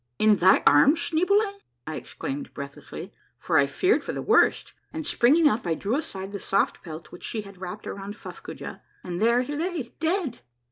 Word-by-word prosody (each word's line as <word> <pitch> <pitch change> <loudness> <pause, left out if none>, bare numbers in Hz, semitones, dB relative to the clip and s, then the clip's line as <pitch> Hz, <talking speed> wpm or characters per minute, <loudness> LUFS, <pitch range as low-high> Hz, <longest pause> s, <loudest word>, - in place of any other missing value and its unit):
" - - -51
In 210 -1 +6
thy 185 +2 +5
arms, 275 - +6
Schneeboule? 400 +5 +1
" - - -51
I - - -5
exclaimed 270 0 -6
breathlessly, 140 0 -8 0.2
for - - +2
I 140 - +4
feared 370 - +2
for - - -4
the - - -3
worst, - - +3 0.2
and 315 -1 -5
springing 300 +7 +4
up 215 -8 0
I 165 - +1
di'ew 205 +9 -1
aside 200 -10 -4
the 200 - -4
soft 195 - 0
pelt 160 -1 -9
which 175 - -12
she 220 - -3
had 200 -2 -13
wrapped 190 +3 -6
around 200 +1 -6
Fuffcoojah, - - -9 0.2
and 175 +1 -4
there 235 +2 +4
he 290 +3 -5
lay, 325 -5 -3
dead 325 - -1
235 Hz, 195 wpm, -26 LUFS, 190-320 Hz, 0.2 s, In